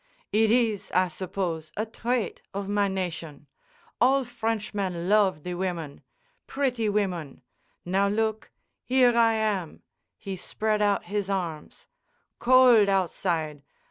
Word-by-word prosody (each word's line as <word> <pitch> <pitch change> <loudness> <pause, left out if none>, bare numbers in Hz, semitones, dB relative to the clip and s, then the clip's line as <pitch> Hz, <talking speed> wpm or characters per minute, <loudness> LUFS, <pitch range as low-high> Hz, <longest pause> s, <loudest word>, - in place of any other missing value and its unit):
"It 220 +1 +3
is, 225 -3 +1
I 185 0 +3
suppose, 170 -2 -4
a 215 - 0
trait 235 -1 -2
of 200 0 -3
my 205 0 +1
nation. 170 -6 -5 0.6
All 270 +2 +4
Frenchmen 210 -7 -3
love 195 -7 +3
the 180 - -4
women—pretty 230 - -4
women. 180 -10 -2 0.4
Now, 195 +3 +2
look: 220 +1 -1 0.3
Here 250 -2 +4
I 230 -1 +4
am!" 210 -7 -2 0.3
He 195 -3 -6
spread 215 +3 -1
out 205 -1 +2
his 205 -1 -3
arms. 170 -6 -4 0.5
"Cold 245 -4 +6
outside! 170 -5 -1
200 Hz, 115 wpm, -26 LUFS, 180-225 Hz, 0.6 s, Cold